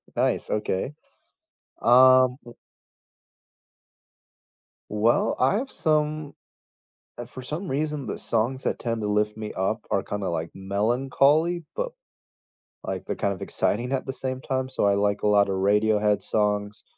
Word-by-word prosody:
Nice, - - 0
okay. 105 +4 -1 0.9
Um, 130 +1 +6
w 120 - -11 2.4
Well, 105 +3 +2
I 130 +8 +3
have 265 +5 -2
some 155 -1 0 0.8
eh, 120 - -6
for 130 +2 -9
some 155 +9 -5
reason, 150 0 -2
the - - -4
songs 120 +4 -1
that - - -1
tend 115 -2 -2
to 105 - -2
lift 105 0 +1
me 110 -1 -5
up 100 +4 -2
are 100 - +1
kinda, 100 -2 -3
like, 85 0 -3
melancholy, 135 - +1
but, - - -2 0.9
like, - - -4
they're - - -4
kind 100 - 0
of - - -11
exciting 120 +5 -1
at 135 - -1
the 135 - -3
same 130 -1 -4
time. 130 -1 -2
So, 130 - -1
I 100 - +4
like 100 0 0
a - - +1
lotta 100 -1 +4
Radiohead 105 +2 +2
songs, 105 0 -1
115 Hz, 145 wpm, -25 LUFS, 105-135 Hz, 2.4 s, Um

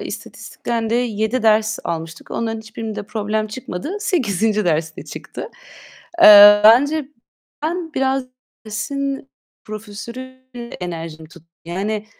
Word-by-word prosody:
istatistikten 230 -2 -5
de - - +1
7 235 0 0
ders 215 -1 +3
almıştık. 165 0 -5
Onların 225 -1 -3
hiçbirinde 220 -1 -6
problem 215 +1 -2
çıkmadı. 225 - -6
8'inci 220 - 0
derste 160 -2 -1
çıktı. 470 - -8 0.7
Eee, 205 0 +10
bence 280 +6 +5 0.5
ben 325 0 -3
biraz 265 0 0 0.4
dersin 270 +6 -4 0.3
profesörüyle 240 +4 -9
enerjim 165 -3 -6
tut 170 -1 -16 0.2
yani, 205 +5 -3
220 Hz, 105 wpm, -20 LUFS, 205-260 Hz, 0.7 s, Eee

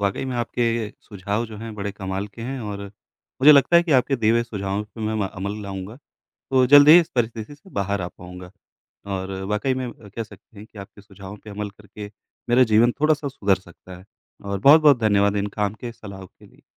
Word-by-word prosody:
वाक़ई 100 +5 -1
में 130 -1 -4
आपके 120 0 -1 0.4
सुझाव 100 +3 -4
जो 110 -1 -10
हैं 115 -1 -8
बड़े 100 -1 -5
कमाल 95 0 -5
के 115 +3 -11
हैं 130 +1 -5
और 100 -2 -6 0.6
मुझे 150 - +9
लगता 145 +4 +5
है 170 - +6
कि 165 -4 -1
आपके 135 +1 +2
दिए 110 -2 +1
हुए 115 0 +2
सुझावों 100 -3 -4
पे 105 +1 -14
मैं 100 -3 -1
अमल 100 +3 -6
लाऊँगा, 100 +3 -7 0.5
तो 130 -1 +3
जल्द 145 +1 +8
ही 170 +3 +10
इस 165 - -2
परिस्थिति 115 +3 -2
से 190 +7 -20
बाहर 100 0 -2
आ 85 - -3
पाऊँगा। 90 0 -12 0.6
और 95 +1 -5 0.2
वाक़ई 105 +6 0
में 130 -2 -4
कह 105 +2 -8
सकते 110 0 -18
हैं 105 - -10
कि 110 - -14
आपके 100 +1 -12
सुझावों 100 0 -12
पर 105 - -14
अमल 105 0 -5
करके, 105 +1 -12 0.4
मेरा 125 +2 +5
जीवन 120 +3 +5
थोड़ा-सा 155 -1 +2
सुधर 100 -8 +1
सकता 90 0 -14
है 95 - -16 0.4
और 100 -1 -4
बहुत-बहुत 145 +1 +6
धन्यवाद 100 -2 +2
इन 100 +1 -1
काम 105 0 0
के 120 -1 -5
सलाहो 100 -4 -11
के - - -21
लिए। - - -24
105 Hz, 210 wpm, -22 LUFS, 100-120 Hz, 0.6 s, ही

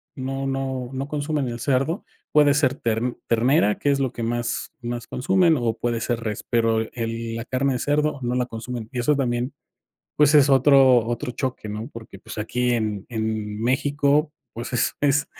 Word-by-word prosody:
no 135 0 -3
no 135 -2 -3
no 135 +1 -3
consumen 150 -2 -1
el 120 - -5
cerdo 135 - 0 0.3
puede 150 -1 +5
ser 140 -3 +2
ter 115 -4 -1 0.3
ternera 115 -2 +3
que 145 - +2
es 140 - +1
lo 130 -3 0
que 115 - -5
más 120 0 -2
más 120 -1 -5
consumen, 175 +4 +3
o 115 -2 0
puede 120 -1 -1
ser 120 -2 -1
res 110 -2 -4
pero 115 -2 +2
el 115 -1 -3
la 115 - -4
carne 135 +2 0
de 125 - -2
cerdo 150 +1 0
no 120 +1 -1
la 125 0 +1
consumen 115 -1 -6
y 125 - -2
eso 150 +5 +3
también, 125 -1 -1 0.6
pues, 150 0 +5
es 145 -1 +6
otro 135 -3 +6
otro 125 +2 -3
choque, 125 -4 -4
¿no? 105 +3 -5
Porque, 110 -4 -10
pues, - - -9
aquí 125 +3 0
en 105 -4 -1
en 110 -2 -3
México, 145 +3 +2 0.2
pues, 115 +2 -6
es 125 - +1
es 145 0 +2
125 Hz, 185 wpm, -23 LUFS, 115-140 Hz, 0.6 s, es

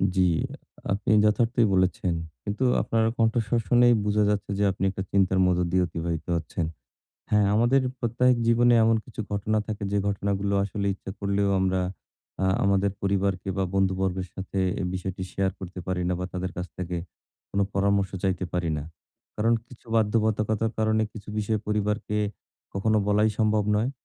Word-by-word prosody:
জ্বী। 95 -1 +4 0.6
আপনি 100 +2 0
যথার্থই 115 +2 +3
বলেছেন। 95 -1 +1 0.3
কিন্তু 105 +6 -2 0.2
আপনার 115 -1 +1
কণ্ঠস্বর 115 +1 +2
শুনেই 120 0 +6
বুঝা 105 0 +2
যাচ্ছে 105 -1 -1
যে, - - +2
আপনি 95 - -5
একটা 95 0 -4
চিন্তার 95 -1 +3
মধ্য 90 -1 +2
দিয়ে 90 0 +3
অতিবাহিত 80 -1 -3
হচ্ছেন। 85 0 -2 0.7
হ্যাঁ, 105 -1 +4
আমাদের 120 +5 +4 0.2
প্রত্যাহিক 120 +1 +2
জীবনে 120 +1 +5
এমন 115 0 +4
কিছু 115 - -8
ঘটনা 105 +2 0
থাকে, 110 -1 -5
যে 100 - +2
ঘটনাগুলো 100 0 -1
আসলে 100 0 -3
ইচ্ছা 95 - -9
করলেও 100 0 +1
আমরা, 95 0 +1 0.6
আ - - +3 0.2
আমাদের 100 0 +2
পরিবারকে 100 -1 0
বা 95 - +2
বন্ধুবর্গের 95 -1 0
সাথে 95 0 -5 0.2
এই 90 - -1
বিষয়টি 95 0 -4
শেয়ার 95 0 0
করতে 90 0 -8
পারি 90 -1 -1
না 90 - +1
বা - - -2
তাদের 90 0 -3
কাছ 90 - -3
থেকে, 90 -1 -3 0.5
কোন 100 - 0
পরামর্শ 100 0 +2
চাইতে 95 -1 0
পারি 90 -2 0
না। 70 - -5 0.5
কারণ 115 +2 +2
কিছু 125 0 -16
বাধ্যবাধকতার 110 0 +1
কারণে, 110 0 +2
কিছু 105 -1 -11
বিষয়ে 105 0 0
পরিবারকে 105 0 -1 0.6
কখনো 110 +2 +2
বলাই 105 +1 +3
সম্ভব 110 -1 +2
নয়। 115 +5 +1
100 Hz, 160 wpm, -26 LUFS, 95-110 Hz, 0.7 s, শুনেই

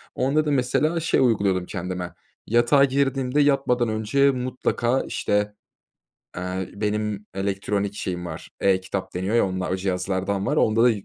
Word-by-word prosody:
Onda 140 +4 +1
da, 150 - 0
mesela, 145 +5 +1
şey 165 - +1
uyguluyordum 100 -7 +2
kendime. 90 -1 -5 0.3
Yatağa 120 +5 +4
girdiğimde, 135 0 +1
yatmadan 130 -4 +2
önce 110 +6 +2
mutlaka, 125 -1 -1
işte, 105 0 0 0.8
eee, 90 +1 -4
benim 105 0 -2
elektronik 100 +1 -2
şeyim 90 -3 -4
var, 80 -2 -8
e-kitap 95 0 0
deniyor 95 +5 0
ya, 115 - +4
onla 95 -1 -3
o 95 - 0
cihazlardan 95 +1 -1
var. - - 0
Onda 110 +1 +3
da 125 - +6
105 Hz, 140 wpm, -24 LUFS, 95-130 Hz, 0.8 s, da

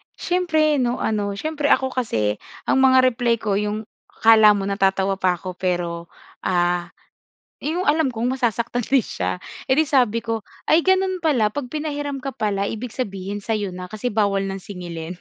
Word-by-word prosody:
siyempre 315 -5 +1
'no, 245 -1 0
ano, 205 -2 -1
siyempre 300 +5 -2
ako 265 -2 +3
kasi 110 - -1 0.2
ang 265 - +2
mga 260 -1 +6
reply 235 0 +1
ko 210 -3 -1
yung 210 +1 -2 0.2
akala 220 -2 +6
mo 200 - -2
natatawa 195 0 +1
pa 185 -1 +2
ako 185 +1 -7
pero, 175 -2 -2 0.3
ah, 175 -1 +1 0.7
yung 330 +5 -2
alam 310 0 +3
kong 235 +2 -1
masasaktan 240 0 -1
rin 265 -2 +3
siya, - - -3 0.3
eh, 260 - +3
'di 310 - +4
sabi 245 -6 +2
ko, 225 -1 -2 0.2
"Ay! 315 - +4
ganun 375 0 +2
pala 260 -11 +2
pag 280 +2 -4
pinahiram 290 -2 -4
ka 275 - -3
pala 200 -4 -1
ibig 225 +1 -6
sabihin 200 -4 -4
sa'yo 205 -4 -2
na 180 0 -8
kasi 215 +3 -3
bawal 200 -3 +1
ng 195 0 -5
singilin." 175 -2 -7
220 Hz, 170 wpm, -22 LUFS, 195-270 Hz, 0.7 s, mga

